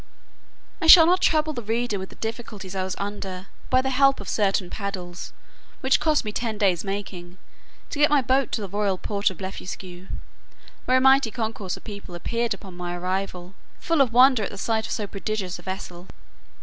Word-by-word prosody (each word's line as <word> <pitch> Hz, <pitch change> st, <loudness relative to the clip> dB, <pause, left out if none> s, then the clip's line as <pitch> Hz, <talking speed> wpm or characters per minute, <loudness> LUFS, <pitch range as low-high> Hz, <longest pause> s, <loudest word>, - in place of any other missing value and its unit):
I 325 Hz, -, 0 dB
shall 325 Hz, 0 st, +11 dB
not 360 Hz, +2 st, +3 dB
trouble 310 Hz, -1 st, +2 dB
the 245 Hz, -, -4 dB
reader 225 Hz, -1 st, -1 dB
with 190 Hz, -, -6 dB
the -, -, -14 dB
difficulties 220 Hz, -4 st, -6 dB
I 190 Hz, -, -1 dB
was 185 Hz, -1 st, -3 dB
under, 195 Hz, -2 st, -5 dB, 0.2 s
by 255 Hz, 0 st, +3 dB
the 265 Hz, -, -1 dB
help 275 Hz, +1 st, +4 dB
of -, -, -8 dB
certain 195 Hz, -3 st, 0 dB
paddles, 185 Hz, -3 st, -5 dB, 0.5 s
which 265 Hz, 0 st, +3 dB
cost 305 Hz, -5 st, +1 dB
me 210 Hz, -, -2 dB
ten 225 Hz, 0 st, -3 dB
days 190 Hz, -5 st, +2 dB
making, 190 Hz, -3 st, -6 dB, 0.5 s
to -, -, -4 dB
get 295 Hz, -, +5 dB
my 290 Hz, -3 st, +3 dB
boat 260 Hz, +2 st, +1 dB
to 220 Hz, -, -1 dB
the 200 Hz, -, -4 dB
royal 200 Hz, 0 st, -1 dB
port 200 Hz, +2 st, 0 dB
of 190 Hz, -, -9 dB
Blefuscu, 185 Hz, -1 st, -7 dB, 0.8 s
where 255 Hz, -, +4 dB
a -, -, +2 dB
mighty 265 Hz, -2 st, +5 dB
concourse 220 Hz, -5 st, -4 dB
of -, -, -15 dB
people 200 Hz, -4 st, -8 dB
appeared 235 Hz, +6 st, -1 dB
upon 190 Hz, -3 st, -12 dB
my 175 Hz, 0 st, -4 dB
arrival, 185 Hz, 0 st, -3 dB, 0.3 s
full 330 Hz, -4 st, +1 dB
of 255 Hz, -4 st, +3 dB
wonder 255 Hz, 0 st, +6 dB
at 200 Hz, -, -2 dB
the 200 Hz, -, -9 dB
sight 220 Hz, +2 st, -1 dB
of -, -, -8 dB
so 210 Hz, -, -2 dB
prodigious 200 Hz, -2 st, -4 dB
a -, -, -10 dB
vessel. 185 Hz, -1 st, -7 dB
205 Hz, 200 wpm, -24 LUFS, 190-250 Hz, 0.8 s, shall